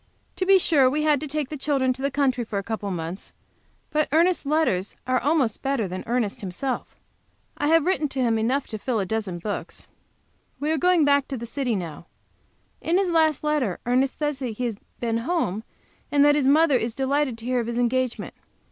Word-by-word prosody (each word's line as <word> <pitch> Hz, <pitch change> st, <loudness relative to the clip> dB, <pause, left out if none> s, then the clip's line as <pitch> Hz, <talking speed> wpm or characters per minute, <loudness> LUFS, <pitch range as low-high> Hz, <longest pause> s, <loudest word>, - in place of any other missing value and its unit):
To 370 Hz, 0 st, -1 dB
be 390 Hz, 0 st, +7 dB
sure, 285 Hz, -7 st, +4 dB
we 300 Hz, +3 st, -1 dB
had 300 Hz, -2 st, +3 dB
to 305 Hz, -, -5 dB
take 295 Hz, -1 st, -2 dB
the 310 Hz, -, -5 dB
children 265 Hz, -3 st, +1 dB
to 260 Hz, -, -10 dB
the 275 Hz, -, +1 dB
country 265 Hz, -3 st, +1 dB
for 215 Hz, -2 st, -4 dB
a 200 Hz, -, -2 dB
couple 210 Hz, -1 st, -4 dB
of 185 Hz, -, -2 dB
months, 170 Hz, +3 st, -6 dB, 0.6 s
but 305 Hz, 0 st, +1 dB
Ernest's 335 Hz, 0 st, +2 dB
letters 280 Hz, -, +1 dB
are 255 Hz, 0 st, +2 dB
almost 275 Hz, -6 st, +1 dB
better 270 Hz, -6 st, 0 dB
than 185 Hz, +1 st, -5 dB
Ernest 235 Hz, -4 st, -1 dB
himself. 210 Hz, +8 st, -4 dB, 0.6 s
I 290 Hz, -, 0 dB
have 325 Hz, 0 st, +4 dB
written 370 Hz, -4 st, +1 dB, 0.3 s
enough 255 Hz, +5 st, 0 dB
to -, -, -15 dB
him 215 Hz, -, -3 dB
to -, -, -28 dB
fill 245 Hz, -4 st, 0 dB
a 195 Hz, -, -1 dB
dozen 205 Hz, -3 st, -3 dB
books. 205 Hz, +4 st, -5 dB, 0.7 s
We 300 Hz, +2 st, -1 dB
are 320 Hz, -, +1 dB
going 355 Hz, -1 st, +4 dB
back 280 Hz, -1 st, +3 dB
to 270 Hz, -, -4 dB
the 235 Hz, -, -6 dB
city 245 Hz, -1 st, -1 dB
now. 170 Hz, -3 st, -6 dB, 0.7 s
In 340 Hz, +2 st, +1 dB
his 380 Hz, -2 st, +1 dB
last 315 Hz, -3 st, +2 dB
letter 295 Hz, -, 0 dB
Ernest 255 Hz, +2 st, +1 dB
says 295 Hz, -3 st, -1 dB
he 245 Hz, -5 st, -4 dB
has 230 Hz, -3 st, -2 dB, 0.2 s
been 230 Hz, -1 st, -1 dB
home, 230 Hz, -, -1 dB, 0.5 s
and 285 Hz, 0 st, +5 dB
that 290 Hz, -, +6 dB
his 290 Hz, -3 st, +2 dB
mother 295 Hz, -1 st, +5 dB
is 230 Hz, -1 st, -3 dB
delighted 270 Hz, -2 st, 0 dB
to 230 Hz, -, -10 dB
hear 250 Hz, 0 st, +1 dB
of 230 Hz, -, -2 dB
his 235 Hz, 0 st, -3 dB
engagement. 245 Hz, 0 st, -1 dB
265 Hz, 210 wpm, -24 LUFS, 225-300 Hz, 0.7 s, be